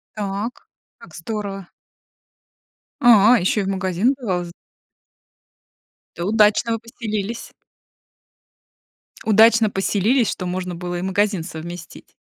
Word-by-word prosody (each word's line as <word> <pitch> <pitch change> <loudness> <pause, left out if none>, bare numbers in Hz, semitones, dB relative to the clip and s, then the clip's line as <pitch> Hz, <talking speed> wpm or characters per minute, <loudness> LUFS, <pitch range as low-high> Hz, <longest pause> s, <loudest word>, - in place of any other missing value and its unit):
Так, 205 +3 -4 0.3
как 165 - -16
здорово. 195 +1 -5 1.3
А, 235 0 +7
ещё 190 +4 +1
и - - -2
в 190 - -4
магазин 190 +5 0
бывал 185 -8 -2
з 170 - -10 1.6
Это 170 - -4
удачно 215 +2 +3
вы 225 - -2
поселились. 225 -1 -5 1.7
Удачно 220 +1 +5
поселились, 205 +5 +1
что 180 - -4
можно 180 0 -4
было 175 0 -5
и - - -4
магазин 190 -1 0
совместить. 170 0 -9
200 Hz, 110 wpm, -21 LUFS, 180-220 Hz, 1.7 s, А